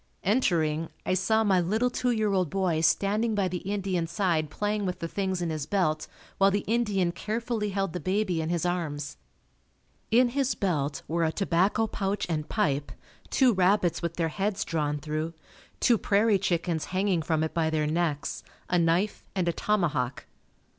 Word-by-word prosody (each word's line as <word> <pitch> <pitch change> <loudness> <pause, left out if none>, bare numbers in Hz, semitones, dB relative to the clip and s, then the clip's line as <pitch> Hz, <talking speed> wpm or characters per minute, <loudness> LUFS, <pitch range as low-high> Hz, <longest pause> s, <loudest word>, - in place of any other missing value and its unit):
Entering, 165 -8 +1 0.2
I - - +1
saw 220 +4 +2
my 190 -4 +3
little 220 +8 +1
two 250 0 0
year 215 -4 +1
old 185 -4 +1
boy 180 -3 0
standing 210 +6 +2
by 200 -2 +1
the 180 0 -3
Indian's 190 -4 -2
side 170 -4 +1
playing 205 +5 -1
with 180 -2 -2
the 165 - -4
things 190 0 -2
in 165 - -1
his 155 -2 -3
belt 155 -5 0 0.3
while 195 0 +6
the 200 0 0
Indian 210 -6 +1
carefully 220 +3 -2
held 195 -3 -2
the 180 - -3
baby 185 -1 0
in 160 - -3
his 175 0 0
arms. 155 -5 -2 0.9
In 245 +2 +5
his 270 +1 0
belt 150 -7 -1
were 165 +1 0
a 160 - +2
tobacco 195 +4 +1
pouch 200 -1 -2
and 155 -2 -2
pipe, 145 -9 0 0.4
two 255 -3 +4
rabbits 185 -2 +2
with 170 -1 -3
their 165 -2 0
heads 195 +4 -1
drawn 150 -3 -1
through, 155 +2 -3 0.4
two 235 -4 +4
prairie 205 0 +3
chickens 170 -3 -1
hanging 185 -2 0
from 160 0 0
it 160 - -2
by 165 -2 +1
their 155 -1 0
necks, 155 -2 -1 0.3
a 180 - +4
knife 170 +5 +1
and 185 -3 0
a 170 - +2
tomahawk. 155 -12 0
180 Hz, 175 wpm, -27 LUFS, 160-205 Hz, 0.9 s, while